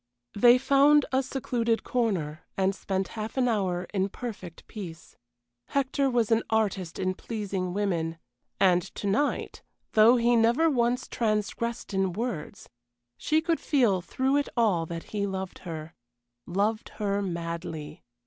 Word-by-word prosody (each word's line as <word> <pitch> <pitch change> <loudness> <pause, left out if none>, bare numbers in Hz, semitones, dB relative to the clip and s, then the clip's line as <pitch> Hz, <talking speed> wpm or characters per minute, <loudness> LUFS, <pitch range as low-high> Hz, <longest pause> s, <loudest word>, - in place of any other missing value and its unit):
They 240 +4 +6
found 280 +2 +5
a 265 0 +3
secluded 240 -3 -1
corner, 180 -11 -1 0.2
and 190 0 +2
spent 190 -1 -2
half 220 +2 -6
an 255 -1 +3
hour 190 -6 0
in 195 0 +1
perfect 200 -7 -8
peace. 175 -7 -9 0.5
Hector 275 0 +1
was 235 -3 +1
an 225 0 +4
artist 200 -6 0
in 185 0 0
pleasing 195 -3 -4
women 175 -5 -1 0.4
and 180 -2 +5
to 190 - -8
night, 215 +9 0 0.3
though 220 +3 +7
he 240 0 +3
never 240 +8 +4
once 245 -1 +1
transgressed 220 0 -2
in 190 -2 +1
words, 220 -6 -4 0.5
she 310 +1 +1
could 330 0 0
feel 235 - +2
through 265 +9 0
it 290 - 0
all 190 -8 +2
that 165 0 -5
he 200 -1 0
loved 190 -1 -5
her 160 -1 -6 0.5
loved 210 +5 0
her 200 -1 0
madly. 170 -4 -5
210 Hz, 140 wpm, -27 LUFS, 185-240 Hz, 0.5 s, though